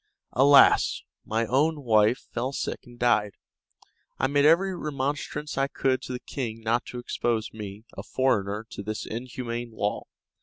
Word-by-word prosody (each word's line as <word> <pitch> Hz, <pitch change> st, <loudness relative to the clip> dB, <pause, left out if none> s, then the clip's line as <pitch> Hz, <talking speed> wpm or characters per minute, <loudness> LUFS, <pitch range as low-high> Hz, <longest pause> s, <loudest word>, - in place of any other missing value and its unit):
Alas! 140 Hz, +3 st, +6 dB, 0.2 s
my 115 Hz, +1 st, 0 dB
own 145 Hz, +5 st, +1 dB
wife 110 Hz, 0 st, +3 dB
fell 125 Hz, +3 st, -2 dB
sick -, -, -3 dB
and 120 Hz, 0 st, -14 dB
died. 110 Hz, -5 st, +2 dB, 0.8 s
I -, -, +1 dB
made 140 Hz, +1 st, +3 dB
every 180 Hz, +5 st, +4 dB
remonstrance 150 Hz, -1 st, -3 dB
I 135 Hz, -, +2 dB
could 130 Hz, -2 st, 0 dB
to 130 Hz, -, -6 dB
the 125 Hz, -, -4 dB
king 115 Hz, -5 st, -5 dB
not 115 Hz, +2 st, 0 dB
to 125 Hz, -, -7 dB
expose 120 Hz, -2 st, -2 dB
me, 105 Hz, 0 st, -8 dB
a -, -, -5 dB
foreigner, 105 Hz, -5 st, 0 dB
to -, -, -6 dB
this 110 Hz, +2 st, -4 dB
inhuman 120 Hz, 0 st, -5 dB
law. 105 Hz, -1 st, -2 dB
120 Hz, 155 wpm, -26 LUFS, 110-135 Hz, 0.8 s, Alas